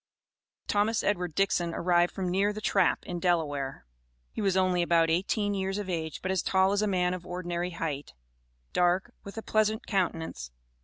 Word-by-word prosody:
Thomas 210 +2 +1
Edward 180 -6 -1
Dixon 175 -4 +1
arrived 175 0 +3
from 185 -2 -3
near 200 +3 +2
the 210 - -6
Trap, - - +2
in 175 -1 -4
Delaware. 145 - -1 0.5
He - - -4
was 195 -2 +2
only 185 -1 +3
about 165 -1 +3
eighteen 205 +4 +1
years 195 0 -1
of 200 -3 -3
age, 160 -3 -4
but 185 - -1
as 190 -3 +1
tall 190 0 +3
as 200 +1 +1
a 215 - +1
man 180 -2 +1
of 185 -1 -5
ordinary 175 0 -3
height; 145 - -4 0.6
dark, 180 +6 +2
with 200 +2 -10
a 225 - -4
pleasant 215 +1 +1
countenance. 165 - -2
180 Hz, 175 wpm, -29 LUFS, 170-200 Hz, 0.6 s, arrived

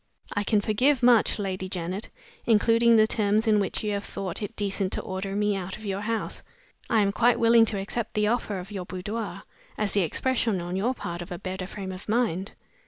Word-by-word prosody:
I 205 - 0
can 210 0 +2
forgive 250 +6 +2
much, 240 -3 +5
Lady 190 -2 -3
Janet 185 +2 -4 0.4
including 230 +1 +5
the 215 -1 +6
terms 215 0 +1
in 215 -2 +4
which 195 +1 -1
you 205 -1 0
thought 195 -2 -5
it 215 +2 -5
decent 195 -2 -1
to - - -1
order 190 +1 -4
me 210 0 +1
out 190 -1 -5
of 215 - -11
your 195 0 -2
house. 225 +1 -2 0.5
I 225 -2 +4
am 200 -1 +2
quite 240 +3 +3
willing 230 0 +6
to 215 -2 -2
accept 210 +3 -4
the 210 0 +2
offer 215 -2 0
of 185 +2 -8
your 190 -3 -5
boudoir, 195 0 -5 0.3
as 210 -2 -1
the 200 - +2
expression 225 - 0
on 175 +1 -4
your 235 +7 0
part 170 -5 -5
of 175 +2 -8
a 175 - -4
better 185 -1 -5
frame 195 -1 -6
of 185 +2 -9
mind. 215 -4 0
205 Hz, 210 wpm, -26 LUFS, 190-225 Hz, 0.5 s, the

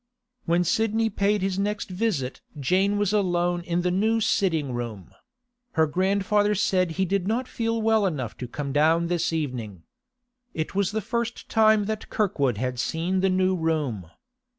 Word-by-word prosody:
When 170 +1 +2
Sidney 225 +4 +1
paid 200 0 +1
his 195 0 -1
next 205 -1 -2
visit 180 - -2 0.2
Jane 190 +8 +2
was 205 -1 +1
alone 175 -3 +1
in 175 0 -1
the 180 - +1
new 220 +5 +2
sitting 165 - +1
room; 115 -7 -6 0.6
her 160 - +4
grandfather 200 +5 +1
said 185 -3 +1
he 190 +3 0
did 190 0 -1
not 240 +4 0
feel 230 -1 -2
well 220 -2 +3
enough 130 - -4
to 125 - -5
come 140 +2 -5
down 165 +3 +3
this 175 -2 0
evening. 125 - -4 0.7
It 155 -1 -3
was 195 -1 +1
the 220 +1 -2
first 235 0 -3
time 220 -1 +4
that 215 +1 -4
Kirkwood 140 - 0
had 125 +1 -2
seen 170 +7 -1
the 190 +1 +2
new 185 0 +2
room. 150 - -2
185 Hz, 165 wpm, -25 LUFS, 155-210 Hz, 0.7 s, her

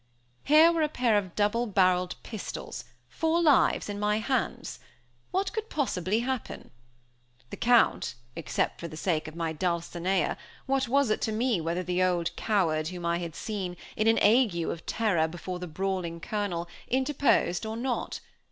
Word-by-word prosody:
Here 310 +3 +7
were 335 -1 0
a 305 - +2
pair 245 -7 +1
of 190 -4 -1
double 215 +4 +1
barreled 185 -3 +2
pistols, 215 -4 -6 0.2
four 325 +1 0
lives 305 -5 +4
in 205 -1 -4
my 210 0 +1
hands? 245 +1 -2 0.5
What 380 +1 -1
could 440 0 -4
possibly 215 - 0
happen? 260 -1 -4 0.8
The - - -6
Count 240 - +3 0.2
except 165 - -2
for 170 - -5
the 155 - -9
sake 160 -3 -1
of 155 - -9
my 165 -1 -2
dulcinea, 175 +1 -1 0.3
what 270 -1 +1
was 275 -1 +2
it - - 0
to 220 - 0
me 225 -3 +1
whether 170 +3 -2
the 180 +1 -1
old 175 -2 +1
coward 165 -8 +1
whom 175 0 -6
I 170 0 +1
had 170 -3 -6
seen, 190 -5 -4 0.2
in 215 - +1
an 225 - +5
ague 220 -2 +5
of 165 - -5
terror 195 -8 +1
before 175 +2 -6
the 180 - -5
brawling 180 0 -3
Colonel, 180 -3 -3 0.2
interposed 260 -8 +2
or 220 0 -4
not? 250 +1 -3
205 Hz, 165 wpm, -28 LUFS, 175-245 Hz, 0.8 s, Here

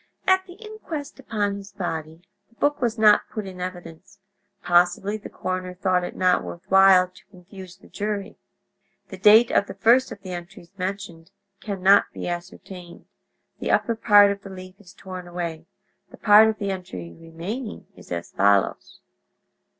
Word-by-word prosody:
At 375 0 +2
the 355 - -11
inquest 365 -10 -8
upon 205 -6 -2
his 200 0 -12
body 165 -3 -5 0.3
the 230 - -29
book 290 +3 0
was 235 -2 -1
not 210 -1 +4
put 215 -2 -6
in 185 -1 -9
evidence; 180 +1 -9 0.5
possibly 175 +3 +2
the 215 - -9
coroner 185 0 -5
thought 185 -1 0
it - - -6
not 185 -1 +2
worth 175 - -9
while 190 -1 +6
to 185 - -20
confuse 185 -1 -13
the - - -19
jury. 205 -1 -4 0.7
The 190 - -10
date 215 +4 +6
of 200 - +2
the - - -8
first 235 +6 +3
of - - -8
the 185 - -7
entries 175 0 -10
mentioned 185 -3 -6 0.3
can 200 -3 -6
not 200 +2 +6
be - - -6
ascertained; 175 0 -8 0.5
the - - -4
upper 230 - +1
part 205 -2 +6
of 200 0 -5
the 195 - -11
leaf 185 -1 -10
is 190 -2 -17
torn 185 -2 -9
away; 170 -2 -6 0.4
the - - -15
part 210 +1 +6
of 220 0 -1
the 200 -1 -3
entry 90 - -7
remaining 180 +9 -7
is - - -16
as 85 -1 -5
follows 100 0 +1
190 Hz, 170 wpm, -23 LUFS, 175-210 Hz, 0.7 s, while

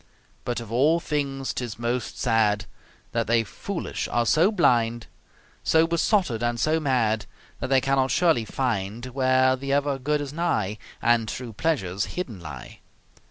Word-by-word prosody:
But 120 -1 -1
of 115 -2 -9
all 145 +8 +3
things 140 -4 -2
'tis 120 -4 -4
most 120 0 -2
sad 110 -3 +2 0.5
That 115 -1 -1
they 115 0 +3
foolish 170 - -4
are 120 0 +1
so 165 - +4
blind, 120 - +2 0.6
So 160 0 +4
besotted 170 - +1
and 120 0 0
so 155 +5 +2
mad, 120 -7 +1 0.3
That - - -3
they 135 -1 +4
cannot 135 0 +2
surely 165 -9 +3
find 110 -2 -2
Where 130 0 +3
the 135 +1 -5
ever 140 -1 +1
good 150 +3 0
is 145 -1 -5
nigh 115 - -1 0.2
And 115 -1 +3
true 125 -3 -6
pleasures 100 - -1
hidden 125 - -4
lie. 75 -7 -9
125 Hz, 155 wpm, -25 LUFS, 115-145 Hz, 0.6 s, so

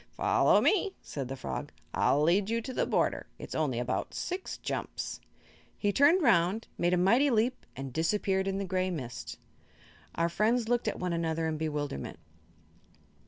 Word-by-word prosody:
"Follow - - +4
me," 400 -1 +2
said 135 -3 -5
the 135 - -5
frog. 65 - -5 0.2
"I'll 145 +2 +3
lead 190 +6 +3
you 230 +1 +1
to 245 +3 -6
the - - 0
border. - - 0
It's - - -8
only - - 0
about - - -2
six 370 +1 -4
jumps." - - -4 0.6
He 205 - +1
turned 310 - +5
around, 200 -2 +3
made 175 +1 +2
a - - +1
mighty 235 +11 +4
leap 240 +1 0
and 135 -1 -6
disappeared 190 +4 +1
in 195 0 -1
the 195 - -2
gray 185 0 0
mist. 130 -9 -6 0.8
Our 170 - +2
friends 220 +6 +1
looked 240 0 +1
at - - -1
one 180 -1 -2
another 165 -1 -1
in 160 - -1
bewilderment. 145 - -3
185 Hz, 165 wpm, -30 LUFS, 160-230 Hz, 0.8 s, turned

